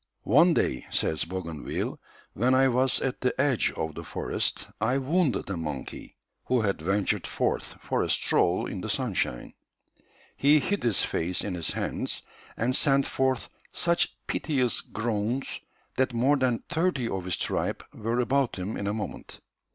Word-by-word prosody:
"One 160 - +5
day," 65 - 0
says 80 - 0
Bougainville, 85 -4 -4 0.3
"when 125 +5 +3
I 135 +1 +5
was 125 +1 +3
at 135 -1 -2
the 125 - 0
edge 140 -5 +3
of 80 0 -3
the - - -7
forest, - - -1 0.2
I 125 +4 +2
wounded 145 +1 +1
a 95 - -2
monkey 75 -4 -6 0.3
who 125 -2 +2
had 100 -6 0
ventured 95 +4 0
forth - - -1
for - - -1
a - - -1
stroll - - +2
in - - -4
the - - -4
sunshine. - - -1 0.8
He 145 +2 +5
hid 200 +8 -1
his 115 -5 +2
face 90 +2 -1
in 100 - -3
his 85 -2 -2
hands - - -2 0.3
and 125 +3 +1
sent 140 -1 +4
forth 130 -1 0 0.2
such 170 0 +1
piteous 130 -7 0
groans 115 +3 -2 0.4
that 130 -1 +2
more 130 +5 +4
than 130 -4 +1
thirty 165 -7 +1
of 95 -5 -3
his 90 -2 -1
tribe - - -1
were 115 +3 -1
about 135 +1 +1
him 95 +3 -4
in 100 - -3
a 105 - 0
moment. 110 - -6
120 Hz, 160 wpm, -27 LUFS, 100-135 Hz, 0.8 s, One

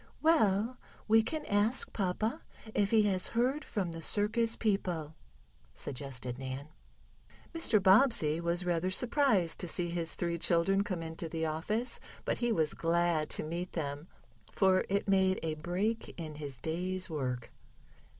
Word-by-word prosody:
"Well, 240 -7 +3 0.3
we 225 +1 +6
can 300 +7 -4
ask 210 +5 +1
papa 215 - -1 0.3
if 200 -1 +2
he 220 -1 +5
has 190 -3 +1
heard 260 +5 +2
from 190 -6 -2
the 165 0 -7
circus 225 +5 +1
people," 180 -8 -1 0.6
suggested 130 -2 -5
Nan. 135 +2 -6 0.8
Mr. 330 -10 +3
Bobbsey 190 - +4
was 170 +1 -1
rather 175 +1 +1
surprised 230 - +2
to 180 - 0
see 175 +1 0
his 170 -1 -1
three 170 -1 -2
children 185 +4 +2
come 185 -5 -3
into 165 0 -5
the 160 0 -2
office, 210 +10 -1 0.3
but - - -1
he 240 -1 +1
was 160 -8 +2
glad 170 -2 +1
to - - -2
meet 170 +3 -4
them, 145 0 -4 0.4
for 190 -1 +3
it 200 +1 0
made 190 -1 +3
a 160 -1 -1
break 180 +9 -2
in 155 -2 -5
his 145 -3 -7
day's 180 +6 -2
work. 130 -7 -3
180 Hz, 150 wpm, -32 LUFS, 160-210 Hz, 0.8 s, we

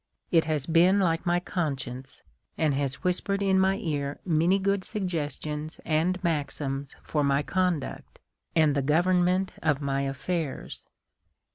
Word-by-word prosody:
It 165 -3 +4
has 150 -3 -1
been 175 +5 +5
like 170 -3 +1
my 175 0 +3
consciejice, 135 -8 -4 0.3
and 155 -3 +2
has 135 -1 -2
whispered 195 +2 0
in 190 -1 +3
my 190 +1 +3
ear 145 -8 -3
many 170 +2 +3
good 200 0 0
suggestions 155 -6 -3
and 165 +4 +1
maxims 140 -4 -2
for 150 -2 0
my 140 +1 +2
conduct, 180 -4 -2 0.4
and 155 -3 +4
the 140 - +1
govern 175 +6 +3
ment 185 +2 +1
of 150 -3 +2
my 140 -1 -1
affairs." 140 +3 -3
160 Hz, 140 wpm, -27 LUFS, 140-180 Hz, 0.4 s, been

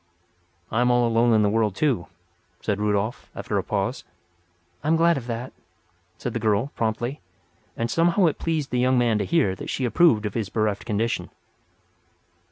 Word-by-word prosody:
"I 115 - +1
am 125 - +3
all 120 -1 +3
alone 115 +1 +3
in 110 -1 +4
the - - +3
world, 110 -2 +1
too," 125 - 0 0.5
said 105 -2 -2
Rudolf, 105 +2 -1
after - - -2
a - - -3
pause. - - -2 0.8
"I - - -3
am 160 - +4
glad 170 +1 +4
of 125 -3 -5
that," 120 +2 -5 0.6
said - - -4
the - - -2
girl, 110 +6 +1
promptly; 120 +4 -2 0.6
and 115 0 -1
somehow 170 - +3
it 160 - +1
pleased 160 -4 -2
the 125 - 0
young 130 +1 +3
man 115 -3 +2
to 100 - -1
hear 135 - +2
that 95 - -8
she 130 - -1
approved 115 -2 +4
of 105 - -3
his 110 -4 -2
bereft 105 -2 -1
condition. 115 +1 -1
115 Hz, 180 wpm, -24 LUFS, 105-135 Hz, 0.8 s, in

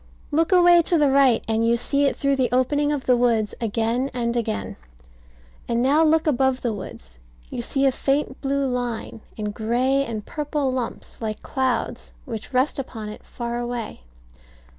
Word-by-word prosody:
Look 325 +4 +2
away 350 -1 +7
to 335 +1 +2
the 290 -3 +3
right, 270 -4 +4
and 225 0 +1
you 230 +1 +3
see 280 +4 0
it 275 - +1
through 275 0 +1
the 255 -4 0
opening 290 +4 +2
of 290 -3 -2
the 250 - +4
woods 230 -3 +1
again 230 +4 0
and 235 -1 -1
again: 100 - -2 0.9
and 235 0 0
now 290 +5 +4
look 320 0 +3
above 265 -3 +2
the 235 -3 -1
woods. 65 - -10 0.3
You - - -3
see 270 +3 0
a 270 - +5
faint 275 0 -1
blue 280 0 0
line, 245 -3 -3 0.2
and 210 -1 -3
gray 250 +5 +1
and 220 -5 -5
purple 295 -2 -2
lumps 255 -2 -5
like 215 -1 -4
clouds, 260 -2 -2
which 225 +2 -6
rest 260 +3 +1
upon 225 -5 -6
it 210 - -9
far 235 -1 -5
away. 240 - -5
250 Hz, 175 wpm, -23 LUFS, 230-275 Hz, 0.9 s, away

